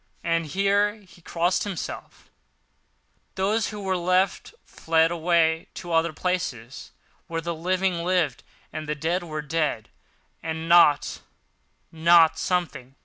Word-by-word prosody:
—and 165 -1 0
here 200 +5 +1
he 190 -4 -19
crossed 175 +2 0
himself) 195 -6 -7 1.0
those 205 +3 0
who 210 - -7
were 190 -2 -1
left 185 - 0
fled 165 0 +1
away 165 -1 +1
to 175 -2 -6
other 165 0 +2
places, 150 -9 -4 0.4
where 165 0 -3
the 170 +1 -3
living 180 +1 -1
lived, 175 -8 0 0.3
and 155 -1 -6
the 150 - -1
dead 165 +5 -1
were 155 -3 -5
dead 150 -7 -2 0.5
and 160 0 -4
not—not 165 0 +2
something. 170 -8 -2
170 Hz, 120 wpm, -25 LUFS, 160-185 Hz, 1.0 s, other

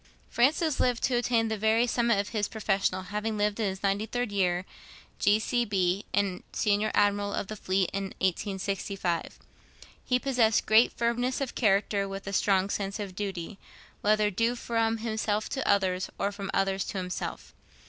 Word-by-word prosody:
Francis 295 +5 +2
lived 245 -2 +1
to 260 - +2
attain 240 -1 +2
the 220 -1 -2
very 220 +3 +3
summit 235 -2 +2
of 200 - -2
his 210 -3 -1
profession, 195 -3 0
having 210 +3 -3
died, 210 +1 0
in 215 - +1
his 190 0 -5
ninety 200 +2 0
third 245 -1 -2
year, 180 -2 +1 0.5
G.C.B. 205 -3 +1
and 200 -2 0
Senior 210 0 +1
Admiral 205 0 +2
of - - -2
the 215 - -6
Fleet, 190 -2 0
in 195 0 -2
1865. 190 -1 -2 0.7
He 250 - +2
possessed 245 -5 +2
great 220 +3 +5
firmness 240 +2 0
of 275 -3 -3
character, 200 -2 +2
with 195 0 -6
a 195 - -5
strong 195 0 +2
sense 200 +1 -3
of 195 -3 -5
duty, 195 -1 -5 0.4
whether 210 0 +3
due 230 +5 +1
from 230 -1 0
himself 220 -1 -1
to 265 - -3
others, 190 -2 +2
or 200 - 0
from 200 -1 -6
others 195 0 +1
to - - -5
himself. 180 -1 -5
205 Hz, 165 wpm, -28 LUFS, 195-225 Hz, 0.7 s, great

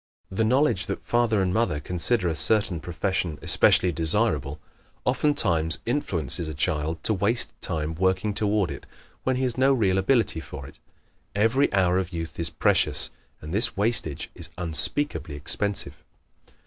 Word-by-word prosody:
The 95 +4 0
knowledge 115 -6 +1
that 100 - -5
father 115 -4 +1
and 90 -1 -1
mother 110 -10 0
consider 90 - -1
a 80 - -1
certain 100 +2 0
profession 85 0 -3
especially 90 - +3
desirable 80 - +1 0.5
oftentimes 110 - +2
influences 85 - 0
a 80 - -6
child 75 +2 -1
to 110 - +2
waste 115 +5 +1
time 80 0 -3
working 95 +4 0
toward 105 -3 0
it - - -9 0.4
when 130 - +1
he 130 - -2
has 125 -1 -1
no 135 +1 +4
real 95 -6 +1
ability 110 -3 +1
for 75 -4 -9
it. - - -14 0.6
Every 115 +7 +2
hour 95 -2 +2
of 95 -1 -4
youth 80 0 -6
is 85 - +1
precious - - +2 0.3
and 75 +2 -8
this 110 +1 +3
wastage 100 -8 +2
is 85 -2 -5
unspeakably 90 - -1
expensive. 75 -1 -2
95 Hz, 150 wpm, -25 LUFS, 80-115 Hz, 0.6 s, no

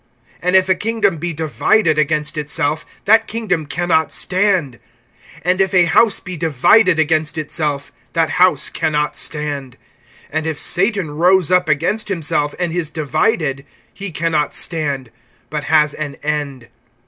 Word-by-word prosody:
(24)And 180 +1 0
if 185 0 +5
a 185 - +4
kingdom 205 -3 0
be 170 +3 -3
divided 160 +2 +1
against 150 0 0
itself, 150 0 -1 0.2
that 225 +2 +4
kingdom 195 -9 -2
can 175 +5 -3
not 160 -1 +2
stand. 180 - +1 0.7
(25)And 180 +1 +1
if 190 0 +1
a 180 -1 +5
house 215 +5 +3
be 185 -1 -7
divided 165 - +3
against 160 0 0
itself, 150 -2 -2 0.2
that 165 -1 +1
house 180 -6 +3
can 155 - -2
not 150 0 0
stand. 145 -4 -3 0.6
(26)And 155 0 -1
if 160 -2 -3
Satan 195 -3 +1
rose 180 +3 +2
up 180 -3 +3
against 165 +9 0
himself, 150 -5 -1
and 175 -2 -2
is 170 -3 -2
divided, 150 - -1 0.3
he 200 0 -5
can 165 0 -2
not 150 -2 0
stand, 140 -7 0 0.4
but 150 -1 -3
has 150 -2 +3
an 150 -2 -5
end. 145 -5 -3
160 Hz, 155 wpm, -17 LUFS, 150-185 Hz, 0.7 s, if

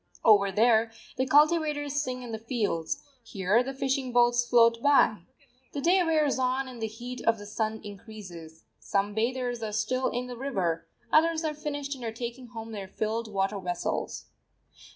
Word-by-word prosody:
Over 200 -3 +6
there 225 +2 +3 0.2
the 260 +1 0
cultivators 295 -1 +3
sing 255 -2 -4
in 240 - -7
the 220 - -4
fields: 215 -8 -2 0.2
here 205 +1 +1
the 265 +2 -3
fishing 265 -1 -1
boats 240 0 +4
float 230 -1 +4
by. 280 -6 +4 0.5
The 285 - -3
day 360 +4 +4
wears 310 -5 +2
on 260 +1 0
and 245 -3 -9
the 220 - 0
heat 240 +3 -7
of 230 0 +4
the 205 - -10
sun 220 +1 -2
increases. 195 -6 -10 0.2
Some 200 +1 -1
bathers 245 +2 -1
are 220 -1 -3
still 240 +5 0
in 245 +1 -2
the 250 -1 -7
river, 190 -11 -2 0.2
others 325 +1 +4
are 310 -1 -1
finished 290 -1 -4
and 260 -3 -9
are 225 - -2
taking 240 +2 -6
home 225 -1 -8
their 200 -3 -6
filled 220 +3 -3
water 195 0 0
vessels. 175 -2 -3
235 Hz, 175 wpm, -28 LUFS, 215-265 Hz, 0.5 s, Over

